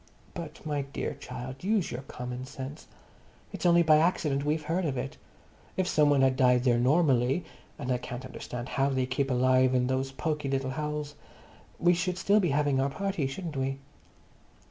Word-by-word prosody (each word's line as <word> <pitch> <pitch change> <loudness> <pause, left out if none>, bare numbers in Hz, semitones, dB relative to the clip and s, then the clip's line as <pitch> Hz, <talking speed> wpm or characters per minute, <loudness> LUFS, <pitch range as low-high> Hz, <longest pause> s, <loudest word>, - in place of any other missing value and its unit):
"But, 165 -4 -8
my 145 -2 -1
dear 140 0 -4
child, 130 +2 -8
use 205 -2 +1
your 120 - -4
common 125 -1 -6
sense. 135 +1 -8 0.7
It's - - 0
only 170 0 +6
by 155 -2 +6
accident 155 -4 +1
we've 155 +1 0
heard 170 +4 0
of 140 -5 -1
it. 130 +2 -4 0.6
If 185 -1 +1
some 150 -1 +4
one 140 -2 +4
had 130 -1 +3
died 125 -2 +4
there 120 -2 +3
normally—and 135 0 +1
I 125 - +1
can't 125 +1 -6
understand 125 -1 -6
how 135 +1 +1
they 130 -2 0
keep 135 +2 -1
alive 130 0 +3
in 125 0 +3
those 130 +1 -1
poky 150 0 -2
little 135 -1 -1
holes—we 150 +3 -3
should 180 +1 -1
still 200 +3 +3
be 180 -5 +1
having 145 -1 +2
our 135 +1 +2
party, 190 -1 -2
shouldn't 155 +3 -6
we?" 135 0 -1
140 Hz, 175 wpm, -29 LUFS, 130-155 Hz, 0.7 s, only